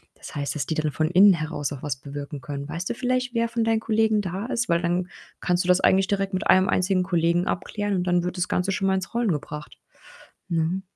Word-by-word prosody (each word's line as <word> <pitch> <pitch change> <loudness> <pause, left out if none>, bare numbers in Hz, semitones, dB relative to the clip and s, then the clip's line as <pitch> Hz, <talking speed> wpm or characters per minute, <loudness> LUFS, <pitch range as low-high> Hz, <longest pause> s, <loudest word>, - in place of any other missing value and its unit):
Das - - -11
heißt, 145 +1 -2
dass 140 -4 -2
die 160 - -2
dann 155 -1 0
von 155 +2 0
innen 195 +2 +7
heraus 155 -4 -3
auch 140 -2 -7
was 145 -3 -2
bewirken 145 +1 -7
können. 140 +1 -6
Weißt 170 +4 -4
du - - -2
vielleicht, 255 0 -1
wer 230 -1 +1
von 230 0 -1
deinen 225 0 +2
Kollegen 220 -1 +2
da 190 +3 -4
ist? 245 -2 -1
Weil 170 0 +2
dann 175 +1 -1 0.3
kannst 180 0 +1
du - - -5
das 180 0 +4
eigentlich 190 0 +4
direkt 195 0 -1
mit 185 +2 -1
einem 185 +1 +6
einzigen 185 -1 +2
Kollegen 170 0 +1
abklären 205 +2 -2
und 180 - 0
dann 175 -1 +2
wird 180 +1 -3
das 180 0 0
Ganze 180 +2 0
schon 195 +1 0
mal 190 - +3
ins 190 +3 -4
Rollen 235 -3 +1
gebracht, 150 -1 -6 0.7
ne? 170 +3 0
180 Hz, 240 wpm, -24 LUFS, 160-200 Hz, 0.7 s, innen